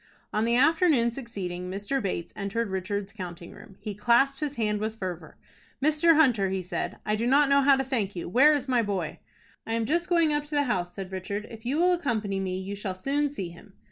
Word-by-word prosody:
On 215 +1 +1
the 235 +1 +2
afternoon 295 -3 +4
succeeding, 185 -8 -5
Mr. 205 +8 -2
Bates 185 -4 -3
entered 200 +2 -2
Richard's 195 +1 -3
counting 175 -4 -8
room. 195 - -14
He 210 - -5
clasped 240 +6 +3
his 290 -2 -3
hand 210 -3 0
with 215 +1 -3
fervor. 180 -6 -6 0.4
"Mr. 310 +3 +4
Hunter," 240 -11 +4
he 190 -1 -2
said, 180 - -3
"I 210 - +1
do 230 +2 -1
not 280 +2 +4
know 280 0 +5
how 275 0 +6
to 270 - 0
thank 230 -7 -2
you. 175 - -5
Where 265 - +6
is 285 -3 0
my 250 -2 +3
boy?" 195 -7 -3 0.5
"I 225 - -2
am 230 -1 0
just 340 +7 0
going 335 -3 +3
up 295 0 -1
to 295 0 -5
the 290 - +4
house," 180 -9 -2
said 195 -2 -6
Richard. 200 +3 -4
"If 225 +1 -9
you 275 +4 0
will 360 +2 +4
accompany 220 - -1
me, 185 -1 -2
you 195 +2 -5
shall 195 -2 -4
soon 285 +9 0
see 195 -11 -5
him." 175 +3 -15
225 Hz, 225 wpm, -27 LUFS, 195-275 Hz, 0.5 s, how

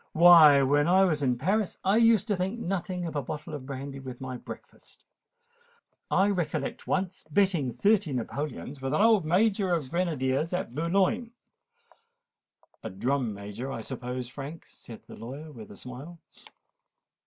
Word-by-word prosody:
Why, 160 -4 +8
when 145 +3 +3
I 190 +2 +5
was 155 -6 +1
in 125 -3 +1
Paris 195 - 0
I 195 +3 +3
used 230 -3 +4
to 205 - +2
think 190 +5 -3
nothing 180 -2 -3
of 160 -3 -5
a 145 - 0
bottle 150 +3 -7
of 135 -3 -7
brandy 140 0 -6
with 130 -2 -8
my 130 -1 -5
breakfast. - - -12 1.1
I 195 - +3
recollect 165 -6 -3
once 190 0 -2
betting 170 -6 +2
thirty 205 -5 +2
napoleons 135 +2 -5
with 135 +2 -1
an - - +2
old 220 -6 +4
Major 195 +3 +2
of 155 -6 -1
grenadiers 155 -3 -1
at 180 -9 -3
Boulogne——" 195 - 0 1.5
"A - - -5
drum 125 +5 -1
major, 105 +6 -6
I 115 - -5
suppose, 125 0 -5
Frank," 145 +5 -8
said 115 - -13
the - - -11
lawyer 140 +7 -8
with 115 -6 -11
a - - -11
smile. 130 - -9
155 Hz, 155 wpm, -28 LUFS, 130-185 Hz, 1.5 s, Why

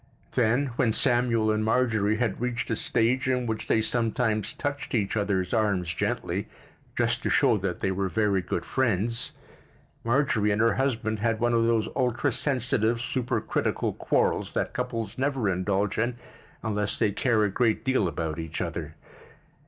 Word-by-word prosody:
Then, 125 +3 +1
when 120 -5 +2
Samuel 120 -3 +2
and 110 0 0
Marjorie 110 -2 +2
had 115 -2 -1
reached 125 -1 -2
a - - +2
stage 125 +5 +1
in 125 -1 +1
which 110 -1 -3
they 110 - +2
sometimes 110 -2 0
touched 145 -2 -3
each 105 -3 0
other's 100 -3 0
arms 100 -7 +1
gently, - - -2 0.5
just - - +1
to - - -1
show - - +4
that 95 -3 -3
they 95 - +1
were 95 0 -1
very 105 -2 +1
good - - -3
friends, 115 -2 0 0.7
Marjorie 115 -4 +2
and 105 +1 +1
her 115 -1 +4
husband 110 -5 -1
had 115 0 0
one 120 0 +1
of 115 -1 +3
those 115 -2 +2
ultrasensitive, 125 -2 +1
supercritical 120 -1 -1
quarrels - - 0
that - - -1
couples 115 -3 -4
never 135 -5 0
indulge 95 +3 0
in 120 +2 0 0.5
unless 105 -2 0
they 110 -3 +2
care 110 +1 +2
a 105 - +1
great 115 +1 +1
deal 130 -7 +2
about 80 -1 -3
each 80 -1 -5
other. 80 -2 -4
110 Hz, 160 wpm, -27 LUFS, 105-125 Hz, 0.7 s, show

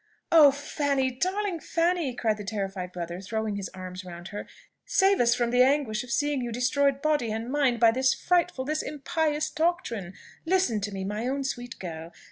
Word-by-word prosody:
"Oh, 310 -3 +9
Fanny! 280 -1 -1
darling 370 +6 -1
Fanny!" 335 -6 0
cried 220 -3 0
the 210 - -6
terrified 195 -3 -4
brother, 175 0 -5
throwing 220 +1 -2
his 200 -1 -4
arms 185 0 -7
round 175 0 -9
her: 205 - -6 0.4
"save 395 -5 +3
us 240 0 +4
from 240 -1 0
the 245 +1 +4
anguish 255 -5 +2
of 250 - -12
seeing 290 +2 0
you 240 -1 -3
destroyed 275 +3 +1
body 295 -7 +1
and 225 +3 -4
mind 270 -5 +2
by 230 -1 +6
this 260 +2 +2
frightful, 350 -6 +1
this 310 +2 -1
impious 305 +1 -1
doctrine! 310 - -1 0.3
Listen 330 - +1
to 205 +1 -3
me, 195 -1 -4
my 210 +5 -3
own 275 +1 -1
sweet 245 -3 -5
girl! 165 -2 -7
250 Hz, 185 wpm, -27 LUFS, 210-300 Hz, 0.4 s, Oh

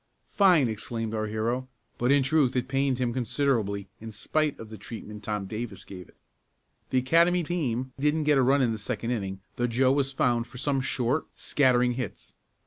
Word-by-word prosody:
"Fine!" 180 - +5
exclaimed 115 0 -4
our 110 -1 -1
hero, 115 +4 -2 0.3
but 120 +2 +2
in 140 -1 +5
truth 135 -2 +2
it 125 0 0
pained 135 -1 +1
him 125 -2 -1
considerably 115 -6 0
in 110 0 -8
spite 150 +8 -1
of 110 -1 -10
the 110 - -7
treatment 105 -1 -8
Tom 105 -1 -3
Davis 105 0 -6
gave 90 -3 -10
it. - - -22 0.7
The 130 - +1
Academy 170 +7 +3
team 130 -7 -2
didn't 150 +2 +1
get 145 -2 +4
a - - +5
run 135 +2 +4
in 120 - +2
the 110 - -4
second 115 +1 -3
inning 95 -5 -3 0.2
though 120 - +1
Joe 130 +2 +3
was 135 -1 +1
found 120 -3 +1
for 125 - -12
some 135 +1 0
short, 130 +2 0
scattering 125 -3 +2
hits. 120 -4 -6
125 Hz, 190 wpm, -27 LUFS, 110-135 Hz, 0.7 s, Fine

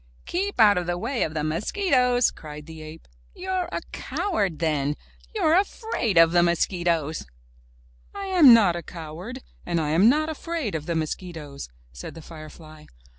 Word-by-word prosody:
''Keep 395 +3 -2
out 205 -4 +6
of 175 - -5
the 175 0 -1
way 235 +7 -2
of 155 - -1
the 150 - -1
mosquitoes!'' 250 - +2
cried 150 -1 -10
the 160 0 -10
ape. 155 +1 -11 0.3
''You're 370 -1 -2
a - - -3
coward 200 - -2
then! 150 -3 0 0.4
You're 325 -6 +3
afraid 375 - 0
of 165 0 +7
the 175 - +5
mosquitoes!" 170 -2 0 0.8
"I 400 0 -6
am 330 -7 +8
not 215 -7 +6
a 175 - -4
coward, 170 +11 -8 0.2
and 175 -1 -2
I 155 -2 -1
am 190 +8 +6
not 305 +4 +2
afraid 320 - -4
of 160 0 -4
the 170 - 0
mosquitoes!" 155 - -5 0.2
said 65 - -9
the 160 - -11
firefly. 155 -1 -12
175 Hz, 165 wpm, -25 LUFS, 155-260 Hz, 0.8 s, am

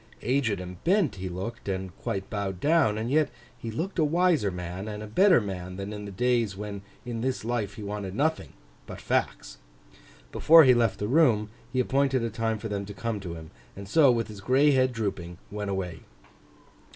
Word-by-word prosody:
Aged 125 -6 +1
and 90 -1 -9
bent 180 - +2
he 95 0 -4
looked, 100 +5 -6
and 95 -2 -4
quite 95 0 -3
bowed 100 -3 -3
down; 145 - +3
and 115 +3 -3
yet 155 +1 +3 0.3
he 115 - -7
looked 170 - -3
a - - +4
wiser 165 - +2
man, 90 +2 -6
and 105 0 -5
a - - -5
better 180 - +5
man, 90 -4 -5
than 100 +2 -5
in 105 -1 -6
the 100 - -7
days 115 -1 0
when 100 -1 -6 0.2
in 115 -2 -4
this 130 -3 -2
life 110 -4 -2
he 105 - -8
wanted 100 -2 -5
nothing—but 155 +6 -4
Facts. - - -2 0.7
Before 165 0 +7
he 130 -2 +7
left 115 -5 +2
the 105 - -3
room, 115 -7 +3 0.2
he 130 - -1
appointed 135 0 +1
a 115 - -2
time 115 0 -1
for 110 - -6
them 100 -2 -3
to 100 0 -9
come 115 -2 -3
to 90 -4 -6
him; 80 -1 -10 0.2
and 100 0 -9
so, 145 +6 +5
with 115 -3 +1
his 105 -3 -10
gray 135 +7 +4
head 130 -1 +3
drooping, 95 -7 -4
went 105 -1 -4
away. 90 -4 -3
110 Hz, 200 wpm, -27 LUFS, 95-130 Hz, 0.7 s, Before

